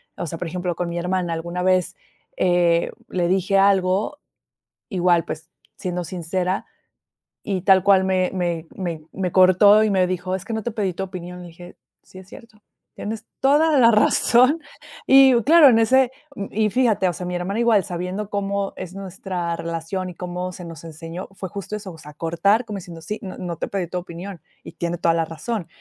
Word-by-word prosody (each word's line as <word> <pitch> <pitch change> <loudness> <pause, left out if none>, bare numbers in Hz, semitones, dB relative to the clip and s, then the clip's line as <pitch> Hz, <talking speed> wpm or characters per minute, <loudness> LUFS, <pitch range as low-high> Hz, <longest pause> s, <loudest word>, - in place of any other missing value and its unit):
o 175 - -5
sea, 165 - -5
por 175 - -4
ejemplo, 175 +1 -3
con 180 - -3
mi 170 - -4
hermana 180 -1 -1
alguna 170 +2 -4
vez, 185 -1 +2 0.4
eh, 175 -2 +2 0.2
le 175 -2 0
dije 190 +2 +1
algo, 195 +7 +2 0.7
igual, 175 -4 +2
pues, 155 - -7 0.3
siendo 180 -1 -3
sincera 180 +2 -2 0.8
y 190 -3 -2
tal 190 -1 +5
cual 195 -1 +5
me 185 -1 +1
me 175 -3 -2
me 170 -5 -4
me 185 -2 -2
cortó 190 +4 +6
y 215 - +1
me 190 -2 +3
dijo: 185 0 -2
"Es 190 - -4
que - - -5
no 220 - -3
te 240 - -1
pedí 200 -4 -2
tu 195 - -3
opinión". 180 -1 -8
Le 175 - -10
dije: 175 +1 -13 0.3
"Sí, 185 - -14
es 190 0 -13
cierto, 215 -1 -15 0.3
tienes 220 +1 -6
toda 295 +3 +4
la 230 -2 +7
razón". 245 +6 +4 0.5
Y 270 -1 +7
claro, 310 +3 +7
en 230 -3 +5
ese 255 +2 +3 0.4
y, 215 0 +1
fíjate, 215 -5 +2
o - - -1
sea, 180 +2 -6
mi 180 - -3
hermana 180 +4 -2
igual 230 -4 +4
sabiendo 185 +3 -4
cómo 200 -1 -2
es 185 0 -7
nuestra 185 -3 -4
relación 170 +3 -4
y - - -11
cómo 180 +1 -5
se 180 - -9
nos 165 -2 -10
enseñó, 165 +3 -8
fue 190 -1 -7
justo 200 +1 -6
eso, 200 -3 -8
o 165 - -14
sea, 150 -1 -12
cortar 200 +9 +1
como 215 -3 -6
diciendo: 170 -3 -10
"Sí, 210 +7 -4
no 190 -3 -7
no 175 -2 -4
te - - -3
pedí 190 -4 -3
tu 180 - -3
opinión". 180 +1 -8 0.2
Y - - -9
tiene 170 +1 -3
toda 165 -1 +2
la 165 -1 +1
razón 165 +5 -4
185 Hz, 200 wpm, -22 LUFS, 175-205 Hz, 0.8 s, la